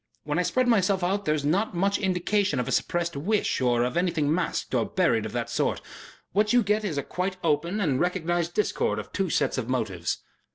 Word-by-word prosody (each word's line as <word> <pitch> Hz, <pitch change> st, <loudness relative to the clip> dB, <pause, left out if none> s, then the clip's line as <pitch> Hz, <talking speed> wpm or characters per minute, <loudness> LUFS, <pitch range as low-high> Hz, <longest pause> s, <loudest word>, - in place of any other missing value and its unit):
When -, -, -1 dB
I -, -, +4 dB
spread 255 Hz, -1 st, +1 dB
myself 195 Hz, -5 st, +2 dB
out 195 Hz, +3 st, 0 dB
there 155 Hz, -, +2 dB
is 145 Hz, -2 st, -3 dB
not 185 Hz, +6 st, +1 dB
much 195 Hz, +3 st, +1 dB
indication 190 Hz, 0 st, +1 dB
of 125 Hz, -, -2 dB
a -, -, -2 dB
suppressed 175 Hz, -2 st, 0 dB
wish 195 Hz, +3 st, 0 dB
or 120 Hz, -2 st, +2 dB
of 125 Hz, +5 st, -2 dB
anything 165 Hz, -4 st, +1 dB
masked 180 Hz, -, -2 dB
or -, -, +3 dB
buried -, -, +1 dB
of -, -, -8 dB
that -, -, -2 dB
sort. -, -, 0 dB, 0.5 s
What 210 Hz, +2 st, +2 dB
you 245 Hz, -1 st, +5 dB
get 210 Hz, +1 st, +1 dB
is 175 Hz, -8 st, -2 dB
a 140 Hz, -, -1 dB
quite 185 Hz, +1 st, -3 dB
open 170 Hz, +5 st, +1 dB
and 145 Hz, -10 st, +1 dB
recognized 175 Hz, -1 st, 0 dB
discord 210 Hz, -, 0 dB
of -, -, -6 dB
two 195 Hz, -2 st, 0 dB
sets 135 Hz, -, +1 dB
of 120 Hz, -1 st, -4 dB
motives." 100 Hz, -9 st, -1 dB
175 Hz, 215 wpm, -26 LUFS, 150-200 Hz, 0.5 s, you